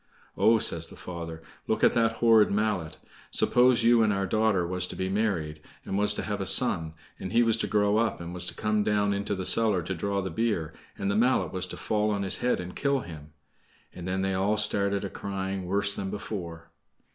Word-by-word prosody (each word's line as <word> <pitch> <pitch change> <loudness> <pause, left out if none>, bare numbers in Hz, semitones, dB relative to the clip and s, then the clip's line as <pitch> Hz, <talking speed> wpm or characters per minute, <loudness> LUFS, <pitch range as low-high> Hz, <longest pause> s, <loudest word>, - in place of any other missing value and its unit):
"Oh!" 115 +1 +4
says 85 -7 0
the - - -12
father, 85 -2 -8 0.2
"look - - -1
at - - +5
that 115 -1 +2
horrid 115 -2 +4
mallet! 100 -7 -1 0.3
Suppose 125 0 +4
you 120 0 +5
and 110 -1 +3
our 100 -1 -1
daughter 105 -2 +1
was 90 +1 -2
to - - -8
be 95 0 -3
married, 90 -7 -2 0.2
and - - -4
was 105 +1 +3
to - - -3
have - - -3
a - - -2
son, 80 -1 +2 0.2
and 95 - -6
he 120 +2 +4
was 115 -1 +3
to - - -2
grow 105 0 +2
up, 115 -1 0
and 85 0 -7
was 90 0 -3
to - - -5
come 105 0 0
down 105 -1 +1
into 100 +1 -2
the 95 -1 -5
cellar 105 -6 +3
to 95 - -4
draw 100 +3 -2
the 95 - -4
beer, 85 -6 -1 0.2
and 100 0 -1
the - - -1
mallet 125 +4 +1
was 95 0 -3
to - - -8
fall 105 0 -1
on 100 -1 -1
his 95 - 0
head 125 - 0
and 90 0 -7
kill 140 -1 0
him!" 75 -5 -11 0.6
And 90 0 -8
then 95 +1 -1
they 95 0 0
all 100 +3 +1
started 100 -1 +1
a - - -4
crying 95 -1 -4
worse 100 +2 +1
than 95 -1 -4
before. 85 -5 -7
100 Hz, 225 wpm, -27 LUFS, 90-110 Hz, 0.6 s, at